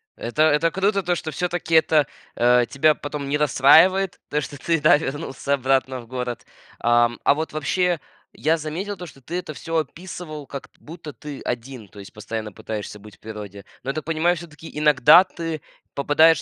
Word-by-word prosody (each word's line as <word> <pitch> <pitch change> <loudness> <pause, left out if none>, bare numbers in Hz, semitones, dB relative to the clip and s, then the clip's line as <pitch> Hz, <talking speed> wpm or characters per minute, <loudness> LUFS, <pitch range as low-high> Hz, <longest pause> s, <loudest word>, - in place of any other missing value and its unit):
Это 135 +6 0
это 155 +2 +3
круто, 195 +2 +1
то 175 0 +1
что 160 -2 -5
всё-таки 175 -1 -1
это, 155 -3 +4 0.3
э, 120 0 +4
тебя 155 +2 +3
потом 145 -1 -5
не 150 - +1
расстраивает, 160 +7 +5
то 150 - 0
что 140 +1 -7
ты, 165 +3 0
да, 150 -1 +6
вернулся 140 -1 -3
обратно 130 -1 +1
в 115 - -16
город. 125 -1 -5 0.3
Ам, 120 0 +2
а - - +4
вот 160 +1 -4
вообще 175 +3 0 0.3
я 160 +2 +1
заметил 170 +7 -5
то, 180 - -7
что 140 -4 -14
ты 170 - -7
это 165 -4 -5
всё 165 +4 -3
описывал, 155 -1 -6
как 140 - -8
т - - -38
будто 160 -1 -10
ты 145 -2 -9
один, 120 -2 -5
то 100 - -15
есть 100 - -11
постоянно 110 0 -5
пытаешься 105 0 -6
быть 105 0 -14
в - - -48
природе. 105 -2 -9 0.2
Но 135 - -1
я - - -9
так 155 - -5
понимаю, 165 +2 +1
всё-таки 160 -1 -10
иногда 150 +3 +7
ты 165 -4 -5 0.3
попадаешь 155 +3 +4
150 Hz, 190 wpm, -23 LUFS, 130-165 Hz, 0.3 s, иногда